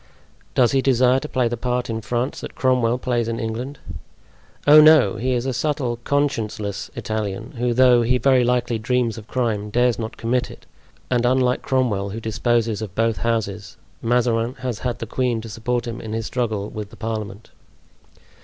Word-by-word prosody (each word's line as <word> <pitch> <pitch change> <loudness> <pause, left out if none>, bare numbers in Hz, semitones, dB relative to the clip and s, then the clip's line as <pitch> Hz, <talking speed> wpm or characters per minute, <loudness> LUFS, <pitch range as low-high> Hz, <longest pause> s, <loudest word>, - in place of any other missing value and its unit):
"Does 125 -2 +4
he 135 - +2
desire 130 0 +3
to 150 - -7
play 125 -2 +1
the 120 - -2
part 125 +1 -2
in 115 -1 -3
France 120 +5 -2
that - - -8
Cromwell 125 -2 +2
plays 120 -2 -1
in 115 0 -3
England?" 120 +5 -4 0.9
"Oh, 150 +1 +9
no! 150 -10 +6
He 130 +4 0
is 120 0 -1
a 135 - -1
subtle, 135 -4 -1
conscienceless 110 -8 -1
Italian, 105 0 -4
who 120 0 +1
though 125 0 +5
he 125 +2 +2
very 130 -1 +3
likely 120 -1 0
dreams 120 0 0
of 105 - -14
crime, 110 -5 -1
dares 120 +2 +2
not 110 -1 -5
commit 125 +2 -1
it; - - -13 0.5
and 120 -1 +2
unlike 125 0 +2
Cromwell, 115 -7 0
who 110 +3 -5
disposes 115 0 0
of 100 -4 -6
both 115 0 +1
Houses, 110 -4 -2 0.2
Mazarin 120 0 +1
has 125 -4 -3
had 125 -2 -2
the 115 - -5
queen 120 +1 -1
to 115 - -9
support 120 +3 -2
him 115 0 -5
in 110 -1 -6
his 115 0 -2
struggle 110 -5 -2
with 105 -1 -6
the - - -14
parliament." 110 -1 -5
120 Hz, 180 wpm, -22 LUFS, 110-125 Hz, 0.9 s, Oh